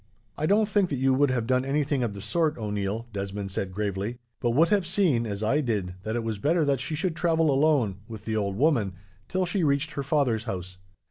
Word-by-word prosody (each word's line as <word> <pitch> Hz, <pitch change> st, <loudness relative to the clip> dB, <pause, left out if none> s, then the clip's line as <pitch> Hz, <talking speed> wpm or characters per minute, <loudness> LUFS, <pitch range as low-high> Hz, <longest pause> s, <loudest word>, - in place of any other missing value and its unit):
"I 155 Hz, -, -1 dB
don't 210 Hz, +3 st, +4 dB
think 200 Hz, -3 st, +2 dB
that 140 Hz, -, -1 dB
you 135 Hz, 0 st, +2 dB
would 140 Hz, +1 st, +3 dB
have 125 Hz, -3 st, 0 dB
done 130 Hz, +1 st, +2 dB
anything 140 Hz, 0 st, 0 dB
of 115 Hz, -4 st, -2 dB
the 100 Hz, -, -7 dB
sort, 155 Hz, -, 0 dB
O'Neil," 105 Hz, +1 st, -3 dB
Desmond 100 Hz, 0 st, -4 dB
said 95 Hz, 0 st, -3 dB
gravely, 100 Hz, +3 st, -3 dB, 0.2 s
"but 120 Hz, -, 0 dB
would 155 Hz, +8 st, +4 dB
have 200 Hz, -5 st, +2 dB
seen, 165 Hz, -, +2 dB
as 100 Hz, 0 st, -4 dB
I 135 Hz, +8 st, +2 dB
did, 105 Hz, -9 st, -1 dB
that 110 Hz, +3 st, -3 dB
it 120 Hz, -, -1 dB
was 110 Hz, -3 st, -3 dB
better 155 Hz, -, +2 dB
that 140 Hz, -2 st, +1 dB
she 155 Hz, +5 st, -3 dB
should 165 Hz, +1 st, -1 dB
travel 165 Hz, -3 st, +2 dB
alone, 135 Hz, -8 st, +2 dB
with 110 Hz, -3 st, -9 dB
the 110 Hz, -, -1 dB
old 100 Hz, -2 st, -1 dB
woman, 120 Hz, -, +2 dB, 0.3 s
till 185 Hz, +4 st, 0 dB
she 180 Hz, +1 st, 0 dB
reached 145 Hz, +1 st, +1 dB
her 145 Hz, -, -3 dB
father's 135 Hz, -5 st, +1 dB
house. 90 Hz, -4 st, -5 dB
130 Hz, 225 wpm, -27 LUFS, 105-155 Hz, 0.3 s, don't